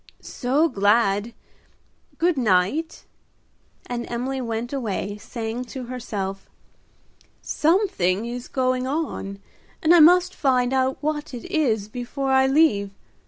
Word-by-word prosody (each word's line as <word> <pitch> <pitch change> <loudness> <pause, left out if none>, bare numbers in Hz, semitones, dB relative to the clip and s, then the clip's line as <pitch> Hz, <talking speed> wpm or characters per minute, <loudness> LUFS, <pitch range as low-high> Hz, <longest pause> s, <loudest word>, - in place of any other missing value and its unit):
"So 280 +6 +1
glad, 205 -2 +2 0.9
good 345 0 +2
night;" 240 - 0 0.8
and 240 -1 -5
Emily 260 +3 -3
went 230 +1 -4
away, 205 -5 -3
saying 230 +2 -5
to 260 +1 -7
herself, 210 -6 -5 0.9
"Something 300 - +1
is 240 +1 -6
going 255 -1 0
on, 275 -9 -3 0.4
and 320 +2 +4
I 350 - +7
must 360 +3 +6
find 255 -2 +1
out 260 0 +1
what 295 -2 -3
it 240 - -8
is 270 - 0
before 255 +4 -4
I 265 0 +4
leave. 265 -9 +3
250 Hz, 115 wpm, -23 LUFS, 220-290 Hz, 0.9 s, I